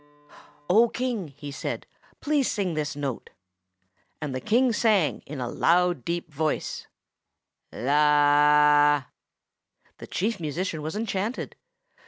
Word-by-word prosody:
"O 225 Hz, +6 st, +5 dB
King," 240 Hz, -8 st, -3 dB
he 145 Hz, -1 st, -7 dB
said, -, -, -5 dB, 0.4 s
"please 290 Hz, -3 st, +1 dB
sing 195 Hz, -5 st, -1 dB
this 150 Hz, -2 st, -3 dB
note." 140 Hz, -4 st, -5 dB, 0.9 s
And 150 Hz, -3 st, -4 dB
the 130 Hz, -, -4 dB
King 240 Hz, +3 st, +2 dB
sang, 210 Hz, -9 st, +2 dB
in 150 Hz, -1 st, -7 dB
a 125 Hz, -, -3 dB
loud, 175 Hz, +1 st, +2 dB
deep 170 Hz, 0 st, -4 dB
voice, 155 Hz, +2 st, -2 dB, 0.8 s
The 145 Hz, +1 st, +4 dB, 1.0 s
Chief 210 Hz, +2 st, -1 dB
Musician 160 Hz, +1 st, -3 dB
was 155 Hz, +4 st, -5 dB
enchanted. 215 Hz, +1 st, -3 dB
160 Hz, 110 wpm, -25 LUFS, 145-205 Hz, 1.0 s, O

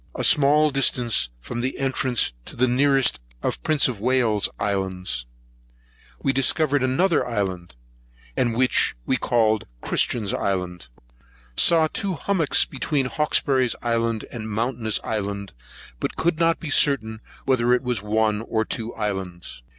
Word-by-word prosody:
a -, -, -3 dB
small 150 Hz, +1 st, +4 dB
distance 125 Hz, -, +2 dB
from 120 Hz, -, -5 dB
the 130 Hz, +2 st, -2 dB
nearest 130 Hz, -, +1 dB, 0.2 s
of -, -, 0 dB
the -, -, -9 dB
Prince 155 Hz, -2 st, +2 dB
of 120 Hz, -6 st, -4 dB
Wales's 115 Hz, -3 st, +2 dB
Islands, 95 Hz, -10 st, -2 dB, 1.0 s
we 135 Hz, -, +2 dB
discovered 145 Hz, +2 st, +2 dB
another 150 Hz, +7 st, +2 dB
island, 95 Hz, -, -4 dB, 0.6 s
and 115 Hz, -2 st, 0 dB
which 130 Hz, 0 st, +2 dB
we -, -, +1 dB
called 110 Hz, -4 st, +1 dB
Christian's 105 Hz, -, 0 dB
Island. 90 Hz, -6 st, -3 dB, 0.7 s
Saw 165 Hz, -, +5 dB
Two 195 Hz, +4 st, -2 dB
Hummock 165 Hz, -2 st, -1 dB, 0.2 s
between 140 Hz, 0 st, -1 dB
Hawkesbury's 135 Hz, -3 st, +1 dB
Island 115 Hz, -1 st, -1 dB
and 110 Hz, -2 st, -6 dB
Mountainous 110 Hz, 0 st, -1 dB
Island; 100 Hz, -2 st, -4 dB, 0.5 s
but -, -, -3 dB
could 170 Hz, 0 st, 0 dB
not 165 Hz, 0 st, +2 dB
be 155 Hz, -, -5 dB
certain 110 Hz, -8 st, +2 dB, 0.2 s
whether 125 Hz, -3 st, +2 dB
it 125 Hz, -, +2 dB
was 125 Hz, -3 st, -1 dB
one 105 Hz, 0 st, 0 dB
or 110 Hz, -1 st, -1 dB
two 115 Hz, +1 st, -4 dB
islands. 95 Hz, -, -5 dB
120 Hz, 130 wpm, -23 LUFS, 105-135 Hz, 1.0 s, Saw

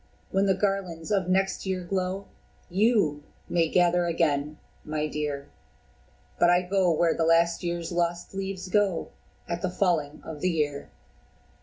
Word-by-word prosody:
when 195 Hz, +1 st, +2 dB
the 190 Hz, -, +3 dB
garlands 195 Hz, -3 st, -2 dB
of 190 Hz, -3 st, +1 dB
next 190 Hz, +1 st, +1 dB
year 185 Hz, -1 st, -1 dB
glow, 185 Hz, +2 st, -2 dB, 0.5 s
YOU 195 Hz, -7 st, +2 dB, 0.3 s
may 165 Hz, -2 st, +1 dB
gather 175 Hz, 0 st, +3 dB
again, 150 Hz, -3 st, 0 dB, 0.3 s
my 155 Hz, 0 st, -2 dB
dear 145 Hz, -2 st, -3 dB, 0.9 s
But 175 Hz, -, +5 dB
I 175 Hz, +1 st, +4 dB
go 185 Hz, 0 st, +2 dB
where 165 Hz, 0 st, +3 dB
the 165 Hz, -, 0 dB
last 165 Hz, +1 st, +3 dB
year's 170 Hz, -1 st, -3 dB
lost 175 Hz, +1 st, -1 dB
leaves 195 Hz, -1 st, -4 dB
go 195 Hz, -3 st, +1 dB, 0.4 s
At 170 Hz, 0 st, -3 dB
the 185 Hz, -, 0 dB
falling 170 Hz, -6 st, 0 dB
of 155 Hz, -2 st, -8 dB
the 185 Hz, -, +2 dB
year." 150 Hz, -4 st, -1 dB
175 Hz, 150 wpm, -27 LUFS, 160-190 Hz, 0.9 s, But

